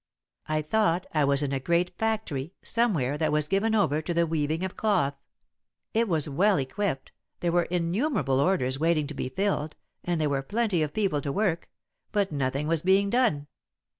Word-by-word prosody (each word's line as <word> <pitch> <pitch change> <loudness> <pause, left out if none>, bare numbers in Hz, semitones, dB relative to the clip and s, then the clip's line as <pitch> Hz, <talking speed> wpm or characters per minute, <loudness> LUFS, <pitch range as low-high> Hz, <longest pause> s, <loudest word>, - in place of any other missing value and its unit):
I 155 0 0
thought 175 0 +1
I 155 -2 +3
was 140 +1 +3
in 140 -1 -2
a 135 - 0
great 170 +5 0
factory, 205 -9 -2
somewhere, 160 - 0
that 160 - +1
was 150 0 +1
given 210 +6 +1
over 155 -8 +2
to 170 +2 -3
the 170 0 +3
weaving 160 +1 -1
of 190 - -4
cloth. 190 -10 +1 0.8
It 230 +1 +2
was 160 -6 +1
well 190 +8 +3
equipped, 140 +1 -2 0.3
there 175 - +1
were 175 0 +2
innumerable 180 - 0
orders 140 -5 +1
waiting 160 -1 +2
to 150 - -6
be 130 - -4
filled, 160 -1 -1 0.3
and 175 -2 -1
there 155 - +1
were 140 -1 0
plenty 205 +3 0
of 150 -1 -1
people 190 -9 +1
to 140 - -3
work, 175 -1 -1 0.4
but 200 -3 0
nothing 140 0 -1
was 165 -1 +1
being 195 +2 +3
done. 235 - +2
165 Hz, 185 wpm, -27 LUFS, 145-200 Hz, 0.8 s, I